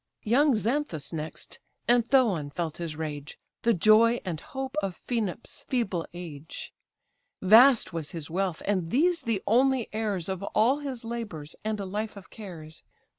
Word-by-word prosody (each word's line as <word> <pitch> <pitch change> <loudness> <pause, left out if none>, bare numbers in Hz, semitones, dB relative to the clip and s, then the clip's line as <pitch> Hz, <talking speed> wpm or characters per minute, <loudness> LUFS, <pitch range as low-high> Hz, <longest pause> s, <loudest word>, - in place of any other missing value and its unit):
Young 265 +5 +4
Xanthus 220 - -1
next, 155 0 -6 0.3
and 240 0 +5
Thoon 220 - +2
felt 160 +1 -3
his 165 -3 -4
rage; 150 -2 -5 0.2
The 235 -1 +3
joy 220 +5 +5
and 170 -4 -3
hope 265 -1 -6
of 195 -3 -4
Phaenops' 225 -3 -3
feeble 195 -10 -1
age: 165 -3 -8 0.7
Vast 225 +2 +6
was 160 -3 -3
his 165 -5 -5
wealth, 180 0 -2
and 185 -5 0
these 335 - +2
the 225 -4 -1
only 255 +2 +3
heirs 210 -6 -2
Of 190 -1 -3
all 225 +7 +2
his 260 -5 -4
labours 210 -11 -6
and 215 0 -2
a 200 - -3
life 210 +2 -4
of 195 - -13
cares. 165 -8 -10
205 Hz, 155 wpm, -28 LUFS, 170-235 Hz, 0.7 s, Vast